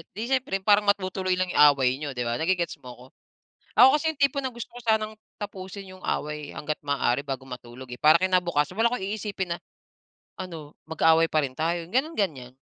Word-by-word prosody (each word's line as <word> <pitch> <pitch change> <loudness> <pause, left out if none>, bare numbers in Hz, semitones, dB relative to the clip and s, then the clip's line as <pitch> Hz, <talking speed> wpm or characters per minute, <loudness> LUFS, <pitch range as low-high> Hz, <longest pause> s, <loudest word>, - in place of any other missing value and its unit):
'di 220 +5 -5
siyempre 255 -8 0
parang 205 +1 +4
matutuloy 185 -2 0
lang 185 - 0
'yung 180 - +1
away 130 -2 +1
niyo 145 -1 -5
'di 125 - -6
ba, 120 0 -1
nage-gets 170 +1 0
mo 125 - -8
ko? 125 - -14 0.8
Ako 265 +3 +8
kasi 320 +1 0
'yung 300 - -22
tipo 280 -1 +3
na 260 - -1
gusto 235 -1 -7
ko - - -8
sanang 220 -1 +1 0.3
tapusin 195 -1 -7
'yung 185 - -18
away 150 -1 -3
hangga't 150 +1 -4
maaari 140 -1 0
bago 135 -2 -5
matulog 125 0 -10
eh, 125 - -7
para 155 +2 +6
kinabukasan 180 -3 +1
wala 225 +2 +4
akong 245 - -2
iisipin 200 -4 -3
na, - - -18 0.8
"Ano, 165 -5 -8 0.2
magkaaway 160 +1 +4
pa 155 -1 +1
rin 130 - -4
tayo?" 170 +3 -1
Gano'n, 275 - -1
ganyan. 135 -11 -2
180 Hz, 200 wpm, -26 LUFS, 145-205 Hz, 0.8 s, Ako